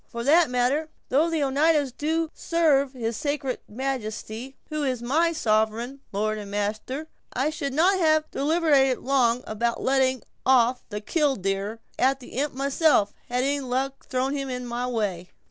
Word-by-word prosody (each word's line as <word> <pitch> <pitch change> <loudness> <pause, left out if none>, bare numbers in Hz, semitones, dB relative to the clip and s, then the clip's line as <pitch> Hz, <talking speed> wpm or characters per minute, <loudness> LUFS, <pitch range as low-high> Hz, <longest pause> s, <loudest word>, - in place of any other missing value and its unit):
For 235 0 -5
that 315 +4 +5
matter, 255 +6 +1 0.2
though 305 +6 +3
the 320 -3 0
Oneidas 285 0 +2
do 320 +4 -1
serve 290 -5 +2
his 230 -3 -3
sacred 285 -3 -2
majesty, 245 0 -4
who 305 -1 -2
is 255 -3 0
my 320 +7 +2
sovereign 230 -1 0
lord 215 +2 -1
and 205 -1 -8
master, 215 +9 -3 0.3
I 275 +4 0
should 285 -2 -3
not 370 +5 +4
have 310 -2 +4
deliberated 285 -3 +3
long 250 -2 +1
about 230 +2 -1
letting 260 -1 +2 0.2
off 250 -1 +3
'killdeer' 210 - -1 0.2
at 270 +1 +3
the 250 - -12
imp 280 +1 -2
myself, 275 -5 +2 0.2
had 250 +1 0 0.2
luck 265 +1 -3
thrown 260 +1 -1
him 275 -1 -3
in 250 -1 -4
my 240 +1 -3
way." 200 -7 -2
265 Hz, 150 wpm, -25 LUFS, 235-295 Hz, 0.3 s, that